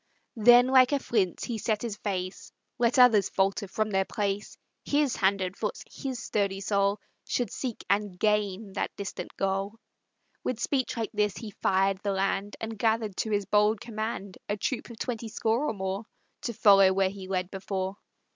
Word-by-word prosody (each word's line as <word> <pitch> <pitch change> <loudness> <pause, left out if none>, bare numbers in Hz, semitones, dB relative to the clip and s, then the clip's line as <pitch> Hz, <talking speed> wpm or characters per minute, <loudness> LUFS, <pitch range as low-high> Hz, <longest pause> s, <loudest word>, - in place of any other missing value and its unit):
Then 240 +3 +7
like 260 0 +5
a - - +4
flint 210 -9 0
he 235 -3 -3
set 215 +1 -1
his 230 -4 -3
face; 185 -3 -4 0.3
Let 235 +1 +2
others 235 -6 +6
falter 195 +1 0
from 215 +3 -1
their 190 -1 +2
place, 200 +1 -3 0.3
His 290 -2 +1
hand 195 0 +2
and 185 0 -2
foot, 210 - -3
his 265 -2 -5
sturdy 200 -2 -1
soul 200 0 +1 0.3
Should 245 - -1
seek 250 -4 -5
and 200 -2 0
gain 210 -1 0
that - - -1
distant 195 -3 -6
goal! 195 +2 -1 0.7
With 250 -3 -2
speech 260 0 -1
like 225 -2 -2
this 210 -1 0
he 220 -3 -7
fired 195 0 +1
the 200 -1 -1
land, 195 +1 -1
And 225 -2 -5
gathered 220 -2 +1
to 220 - -1
his 205 -2 0
bold 210 +1 +3
command 215 -4 -5
A 205 - 0
troop 230 +6 -3
of 235 - -10
twenty 230 -2 -4
score 225 +4 0
or - - -1
more, 190 +2 -3 0.4
To 235 - -2
follow 195 -3 +6
where 190 0 +2
he 195 -1 -9
led 185 -1 -2
before. 190 0 -3
205 Hz, 180 wpm, -28 LUFS, 195-225 Hz, 0.7 s, Then